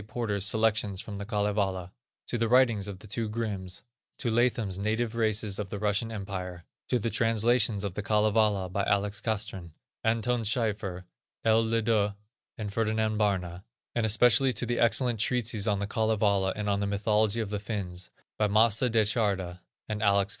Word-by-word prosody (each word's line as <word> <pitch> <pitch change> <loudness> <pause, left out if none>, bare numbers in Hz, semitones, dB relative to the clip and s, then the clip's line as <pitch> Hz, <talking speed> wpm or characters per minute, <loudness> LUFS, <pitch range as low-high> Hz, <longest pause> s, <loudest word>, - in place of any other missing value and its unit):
Porter's 110 -3 -1
Selections 105 -3 +1
from 100 -1 -7
the 100 - -6
Kalevala; 100 -4 -1 0.3
to 120 - -3
the 115 - +1
writings 120 -5 +3
of 100 -2 -6
the 100 - -14
two 110 +2 -3
Grimms; 105 -5 -4 0.3
to 120 - -1
Latham's 115 -5 +1
Native 110 +3 -1
Races 110 -3 0
of 100 -2 -4
the 100 - -4
Russian 105 +2 0
Empire; 95 -4 -6 0.2
to 125 - +2
the 115 0 -2
translations 115 -2 +2
of 100 -3 -3
the 105 - -3
Kalevala 105 -2 +2
by 100 +2 -2
Alex. 100 +1 0
Castrén, 100 -7 -3 0.3
Anton 115 +2 +1
Schieffier, 105 -5 -1 0.4
L. 110 0 +4
LeDuc 110 -2 +1 0.4
and 105 -3 -5
Ferdinand 110 -1 0
Barna; 95 -4 -1 0.3
and 120 - 0
especially 125 +4 +4
to 120 - 0
the 120 +1 -1
excellent 120 0 +2
treatises 115 -2 +1
on 105 -2 +2
the 100 - -2
Kalevala, 105 -3 +1
and 105 -1 -3
on 100 -1 +1
the 100 - -1
Mythology 105 +2 +1
of 110 -3 -3
the 105 - -2
Finns, 95 -4 -5 0.3
by 105 - +3
Mace 110 +1 +4
Da 115 -3 +3
Charda 100 -5 -1 0.3
and 105 -1 -3
Alex. 100 -1 +3
105 Hz, 170 wpm, -28 LUFS, 100-115 Hz, 0.4 s, L